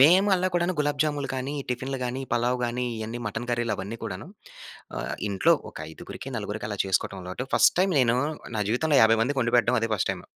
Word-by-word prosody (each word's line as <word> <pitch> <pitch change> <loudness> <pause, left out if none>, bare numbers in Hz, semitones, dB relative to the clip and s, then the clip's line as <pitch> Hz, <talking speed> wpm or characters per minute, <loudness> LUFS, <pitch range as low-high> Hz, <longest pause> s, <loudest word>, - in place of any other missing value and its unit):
మేము 180 +8 +7
అలా 185 0 +1
కూడాను, 175 +1 +1
గులాబ్‌జాములు 145 -1 0
కానీ, 130 +3 -3 0.2
టిఫిన్‌లు 130 +2 -2
గానీ, 125 +2 -3
పలావ్ 120 +1 +1
గానీ, 125 +1 -2
ఇయన్నీ 110 +2 -4
మటన్ 110 +4 -5
కర్రీలవన్నీ 115 -2 -2
కూడాను. 100 - -6 0.7
ఆహ్, - - -3 0.2
ఇంట్లో 95 - +4 0.2
ఒక - - -16
ఐదుగురికి, 135 +10 -8
నలుగురికి 105 0 -4
అలా 100 - -4
చేసుకోటం 95 0 0
అలవాటు. 95 +9 -5
ఫస్ట్ - - +6
టైమ్ 190 0 +3
నేను, 120 -1 +3 0.4
నా 105 - +1
జీవితంలో 145 +5 +3
50 110 0 +5
మందికొండిపెట్టడం 125 -1 +2
అదే 115 - 0
ఫస్ట్ 100 - 0
టైమ్. - - -9
125 Hz, 180 wpm, -26 LUFS, 110-140 Hz, 0.7 s, మేము